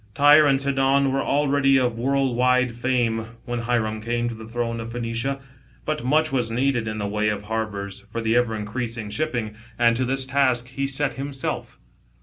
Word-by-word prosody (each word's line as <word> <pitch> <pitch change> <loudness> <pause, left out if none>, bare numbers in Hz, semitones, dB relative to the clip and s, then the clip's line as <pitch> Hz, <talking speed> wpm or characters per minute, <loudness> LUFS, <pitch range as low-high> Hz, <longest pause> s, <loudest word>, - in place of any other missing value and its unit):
Tyre 145 +3 +7
and 135 -1 +3
Sidon 135 0 +2
were 135 +1 0
already 140 -1 +2
of 125 -3 +1
world 135 +1 0
wide 125 0 +3
fame, 115 -2 -1
when 120 0 -3
Hiram 115 -2 -1
came 120 +1 -1
to - - -5
the 110 -1 -10
throne 115 0 -3
of 115 0 -6
Phoenioia; 120 +3 -2 0.5
but 155 -2 -2
much 155 +4 +2
was 125 -4 0
needed 120 -1 0
in 110 0 -3
the 105 - -2
way 105 +1 0
of 105 -1 -3
harbours 105 -3 -4
for 115 - -3
the 115 0 +1
ever 120 -2 +2
increasing 110 0 -4
shipping, 120 -6 -2 0.2
and 120 -1 +4
to 130 - 0
this 135 +1 0
task 130 -3 +1
he 140 +1 -2
set 140 +1 0
himself. 140 -2 -4
120 Hz, 185 wpm, -23 LUFS, 115-135 Hz, 0.5 s, Tyre